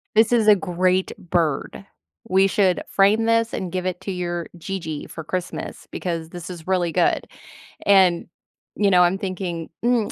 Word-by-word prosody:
this 220 Hz, +2 st, +5 dB
is 225 Hz, -3 st, +3 dB
a 210 Hz, -, +8 dB
great 185 Hz, 0 st, 0 dB
bird. 170 Hz, +1 st, -2 dB, 0.4 s
We 190 Hz, +1 st, +4 dB
should 190 Hz, -2 st, +2 dB
frame 205 Hz, +3 st, +3 dB
this 230 Hz, 0 st, +2 dB
and 180 Hz, -2 st, -3 dB
give 185 Hz, 0 st, -3 dB
it 185 Hz, -1 st, -3 dB
to 195 Hz, -, -4 dB
your 175 Hz, -2 st, -3 dB
Gigi 165 Hz, -4 st, -5 dB
for 160 Hz, -, -8 dB
Christmas 180 Hz, +2 st, -5 dB
because 165 Hz, -3 st, -4 dB
this 175 Hz, 0 st, -8 dB
is 175 Hz, -1 st, -9 dB
really 180 Hz, -3 st, +1 dB
good." -, -, +1 dB, 0.6 s
And, 190 Hz, -4 st, +4 dB, 0.5 s
you 205 Hz, -1 st, +2 dB
know, 180 Hz, -1 st, +6 dB
I'm 180 Hz, +2 st, +2 dB
thinking, 185 Hz, -4 st, -4 dB, 0.2 s
"Mm, 240 Hz, -4 st, +2 dB
185 Hz, 165 wpm, -22 LUFS, 175-195 Hz, 0.6 s, a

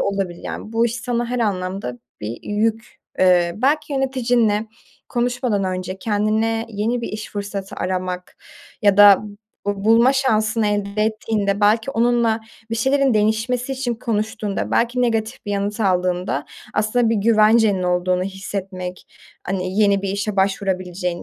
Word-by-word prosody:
olabilir. 195 Hz, -3 st, -2 dB
Yani, 215 Hz, -, -6 dB
bu 230 Hz, +1 st, +3 dB
iş 235 Hz, -, -3 dB
sana 240 Hz, 0 st, -1 dB
her 250 Hz, +1 st, -2 dB
anlamda 185 Hz, -, -2 dB, 0.2 s
bir 110 Hz, +2 st, -5 dB
yük... 220 Hz, +2 st, -2 dB, 0.2 s
Eee, 180 Hz, -2 st, +4 dB
belki 290 Hz, +5 st, +1 dB
yöneticinle 245 Hz, -5 st, +1 dB, 0.4 s
konuşmadan 245 Hz, -4 st, 0 dB
önce 185 Hz, 0 st, -3 dB
kendine 220 Hz, +2 st, 0 dB
yeni 225 Hz, +3 st, -1 dB
bir 235 Hz, -, -4 dB
iş 215 Hz, 0 st, -6 dB
fırsatı 200 Hz, -1 st, -5 dB
aramak 185 Hz, -1 st, -3 dB, 0.5 s
ya 205 Hz, -2 st, +4 dB
da 205 Hz, -1 st, +8 dB, 0.4 s
bu 200 Hz, 0 st, -2 dB
bulma 230 Hz, +4 st, +5 dB
şansını 220 Hz, -5 st, +1 dB
elde 205 Hz, 0 st, -1 dB
ettiğinde 215 Hz, -2 st, -1 dB
belki 220 Hz, +5 st, +3 dB
onunla 235 Hz, -2 st, +2 dB, 0.3 s
bir 230 Hz, -, 0 dB
şeylerin 265 Hz, +2 st, +2 dB
değişmesi 225 Hz, +5 st, 0 dB
için 255 Hz, -2 st, -2 dB
konuştuğunda 215 Hz, -3 st, -2 dB
belki 245 Hz, +2 st, +1 dB
negatif 225 Hz, -1 st, -1 dB
bir -, -, -3 dB
yanıt 205 Hz, +2 st, -2 dB
aldığında 180 Hz, -6 st, 0 dB, 0.3 s
aslında 220 Hz, +3 st, +2 dB
bir -, -, +2 dB
güvencenin 215 Hz, -2 st, +4 dB
olduğunu 180 Hz, 0 st, +1 dB
hissetmek 190 Hz, -1 st, -6 dB, 0.4 s
Hani, 185 Hz, +1 st, -3 dB
yeni 200 Hz, -1 st, +3 dB
bir 200 Hz, -, -2 dB
işe 200 Hz, +1 st, -2 dB
başvurabileceğin 185 Hz, -2 st, -1 dB
210 Hz, 140 wpm, -21 LUFS, 195-230 Hz, 0.5 s, da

